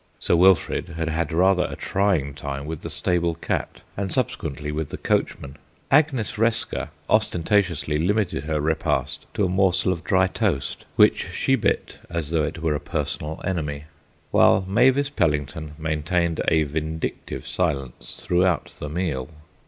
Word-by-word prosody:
Sir - - +1
Wilfrid 90 0 +3
had 80 -1 -1
had 80 -1 -1
rather 90 +2 +3
a - - -5
trying 95 -8 0
time 70 0 -5
with 80 0 -5
the 85 - -6
stable 85 +3 0
cat 85 - -3
and 95 -2 -3
subsequently 75 -1 -2
with 75 -1 -3
the - - -6
coachman. 70 +1 -1 0.3
Agnes 135 -8 +2
Resker 115 -8 0 0.2
ostentatiously 90 -6 +1
limited 90 -4 0
her 75 -1 -1
repast 80 +2 -1
to 105 - +2
a - - +2
morsel 95 0 +2
of 85 -2 -3
dry 95 -2 +3
toast, 80 -6 -2
which - - +4
she 135 - +1
bit 115 -5 0
as 80 -3 -3
though 80 -2 +2
it 80 - -4
were 80 -2 +2
a 75 - -1
personal 75 0 -3
enemy; 75 -6 -2 0.5
while 95 - +5
Mavis 130 +7 +3
Pellington 75 - -1
maintained 80 +2 0
a 80 -1 +4
vindictive 80 +2 -4
silence 70 -8 -2
throughout 90 -2 +1
the 75 - -5
meal. 75 -6 -2
85 Hz, 150 wpm, -24 LUFS, 75-95 Hz, 0.5 s, while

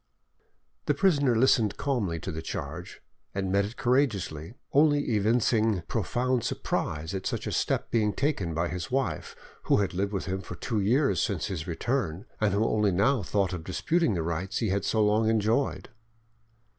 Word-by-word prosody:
The 150 - +2
prisoner 145 -8 +3
listened 115 -3 +3
calmly 115 -12 -1
to 95 - -4
the 80 -1 -5
charge, 80 +3 -6 0.3
and 95 -1 -1
met 100 +1 +3
it 110 +4 -8
courageously, 110 - 0 0.2
only 145 -2 +3
evincing 110 -2 +2
profound 120 +2 0
surprise 80 +4 -2
at 95 -1 -3
such - - -3
a - - -3
step - - -1
being 110 -3 +2
taken 100 - -1
by 85 +1 0
a 90 - -4
wife 135 +1 -2 0.3
who - - +4
had 100 -3 0
lived 100 +2 -1
with 95 - -2
him 95 0 -3
for - - -8
two 110 -3 -2
years 130 +8 +2
since 100 -7 -1
his 85 -5 -4
return, 90 0 -2
and 105 -2 +2
who 110 +2 +2
only 105 -3 +2
now 105 +8 +2
thought 95 0 0
of 85 -3 -5
disputing 155 - 0
the 85 - -1
rights 85 +3 -2
he 110 - 0
had 100 +1 0
so 110 -1 +2
long 110 +1 +3
enjoyed. 110 +5 0
105 Hz, 175 wpm, -28 LUFS, 95-125 Hz, 0.3 s, who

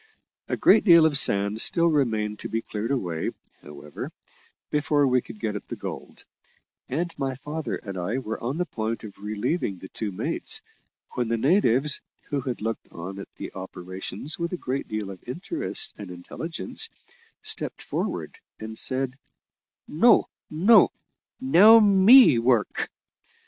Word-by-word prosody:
A - - -2
great - - +5
deal 170 -5 +7
of 155 -2 +2
sand 100 -3 +3
still 170 - +4
remained 110 -10 0
to - - -6
be 115 +1 -2
cleared 110 +2 -4
away, 90 -12 -2 0.3
however, 75 0 -9 0.6
before 145 -1 +2
we 130 -1 +2
could 110 -2 -12
get 105 -1 -2
at 105 - -7
the - - -5
gold; - - -8 0.6
and 165 +6 -2
my 135 -2 -2
father 150 +4 -5
and 100 -2 -8
I 100 +8 -2
were 115 -4 -5
on 130 +6 -2
the 180 - 0
point 115 -6 -4
of 105 -3 -10
relieving 105 - -2
the 95 +1 -11
two 110 -3 -4
mates, 90 - -3 0.5
when 125 -2 -1
the 115 +1 0
natives, 140 - +2 0.3
who 140 -1 0
had 125 -3 -4
looked 115 0 -4
on 95 +4 -7
at 100 - -10
the - - -8
operations 95 - -6
with 170 0 -2
a - - -2
great 135 -3 -4
deal 110 -2 -4
of 95 - -12
interest 180 - -3
and 100 -3 -8
intelligence, 165 - -5 0.5
stepped 435 +1 -3
forward, 450 - -4 0.2
and 110 0 -6
said, 130 -1 +1 0.7
"No, 230 +11 +4 0.2
no; 190 +9 +5 0.5
now 225 -3 +7
me 205 - +7
work." 120 -2 +1
125 Hz, 155 wpm, -25 LUFS, 105-160 Hz, 0.7 s, deal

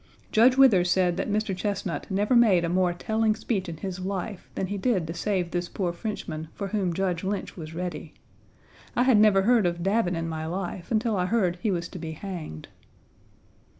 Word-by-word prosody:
Judge 250 +4 +5
Withers 200 -10 +6
said 180 -1 +2
that 195 - -2
Mr. 210 -1 0
Chesnut 200 +1 -3
never 205 +5 +1
made 200 -8 +5
a - - -1
more 180 0 +2
telling 220 +4 0
speech 205 -5 -2
in 165 - -6
his 185 +2 -5
life 190 +1 -4
than - - -1
he 200 +2 -4
did 195 -6 +1
to 165 - -5
save 180 -2 -1
this 175 0 -2
poor 180 -3 -2
Frenchman 170 -5 -5
for 200 -1 -4
whom 190 -3 0
Judge 180 -1 -1
Lynch 195 +1 -3
was 160 -2 -8
ready. 170 -3 -5 0.8
I 245 - +3
had 255 -5 +5
never 205 -2 +5
heard 225 -3 +4
of 170 0 -3
Davin 195 -2 +1
in 165 0 -2
my 160 -1 -4
life 180 0 -4
until 225 0 +1
I 180 -1 0
heard 185 -5 +1
he 215 - 0
was 175 -3 -1
to 180 - -8
be 160 -1 -5
hanged. 160 - -7
190 Hz, 200 wpm, -26 LUFS, 175-210 Hz, 0.8 s, Withers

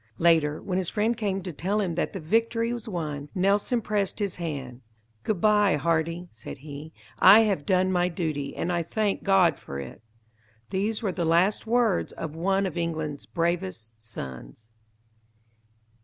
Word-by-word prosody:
Later, 160 -3 +3
when 185 -1 -1
his 180 - -1
friend 225 +2 +1
came 195 -4 -2
to 180 -2 -5
tell 195 +8 -1
him 185 -5 0
that 175 - -1
the 195 - -5
victory 230 +6 +1
was 235 -2 -6
won, 150 -6 -4
Nelson 200 +5 +2
pressed 205 -3 -1
his 200 -3 -2
hand. 135 -7 -5 0.4
"Good 210 -5 -1
bye, 210 -2 +4
Hardy!" 165 +3 0
said 110 0 -9
he, 145 +2 -9 0.3
"I 200 +4 +9
have 195 -9 0
done 185 -1 +3
my 180 -1 +2
duty, 155 -5 -3
and 175 - -1
I 170 - +1
thank 205 +4 -1
God 185 -6 +4
for 70 - -7
it." 70 +9 -8 0.7
These 210 +4 -1
were 200 - +1
the 175 - -2
last 175 +7 +2
words 235 -4 +2
of 160 -2 -6
one 195 +4 +1
of 180 -2 -4
England's 155 -4 -3
bravest 165 - -2
sons. 70 - -9
175 Hz, 165 wpm, -26 LUFS, 155-200 Hz, 0.7 s, I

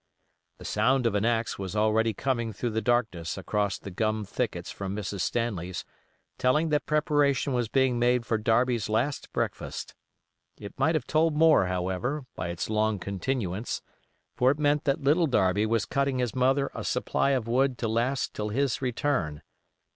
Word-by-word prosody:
The - - -12
sound 130 -1 +2
of 115 - +2
an 105 +1 +1
axe 115 -2 0
was 95 +1 -5
already 110 +1 +2
coming 120 0 -2
through 120 +4 -3
the 110 +1 -1
darkness 110 -9 0
across 100 +1 -1
the 100 - -9
gum 110 +2 -1
thickets - - -3
from 100 0 -5
Mrs. 100 -1 -4
Stanley's, 95 -8 -2 0.5
telling 150 +6 +2
that 150 -1 0
preparation 145 -2 +2
was 120 -2 0
being 130 +1 +2
made 120 0 +2
for 110 -2 0
Darby's 115 0 +1
last 125 +7 -1
breakfast. - - -3 0.6
It 100 - -9
might 160 +1 +3
have 145 -6 -1
told 155 +2 +2
more, 155 - +5
however, 95 +11 -2
by 80 - -3
its 85 0 -3
long 110 0 +1
continuance; 100 +1 -3 0.5
for 125 - +3
it 140 - +1
meant 150 +1 +1
that 140 -2 +1
Little 160 +5 +3
Darby 105 -4 +2
was 115 0 +1
cutting 140 -1 0
his 125 -3 -1
mother 135 +2 +2
a - - -5
supply - - 0
of 115 -3 -5
wood 130 +2 +2
to 115 - -2
last 120 +4 0
till 105 0 -3
his 135 +4 0
return. 125 - -1
120 Hz, 170 wpm, -27 LUFS, 105-135 Hz, 0.6 s, more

